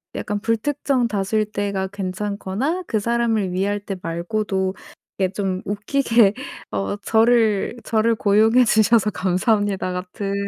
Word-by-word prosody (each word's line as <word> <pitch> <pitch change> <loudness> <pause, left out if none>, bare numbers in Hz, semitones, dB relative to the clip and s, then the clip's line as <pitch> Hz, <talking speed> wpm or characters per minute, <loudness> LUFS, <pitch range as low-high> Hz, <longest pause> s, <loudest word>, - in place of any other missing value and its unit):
약간 205 0 -3
불특정 245 +3 0
다수일 210 0 0
때가 200 -2 -2
괜찮거나 200 - -3
그 215 - 0
사람을 225 -4 0
위할 200 +3 -1
때 200 -1 -6
말고도 190 +3 -2 0.5
이게 190 - +2
좀 190 -2 -2
웃기게 215 0 +2 0.4
어 100 - -2
'저를 225 -2 +3
저를 225 +1 +1
고용해 220 +4 +4
주셔서 220 -1 +3
감사합니다.' 195 0 0
같은 190 +2 -4
205 Hz, 275 characters per minute, -21 LUFS, 190-225 Hz, 0.5 s, 고용해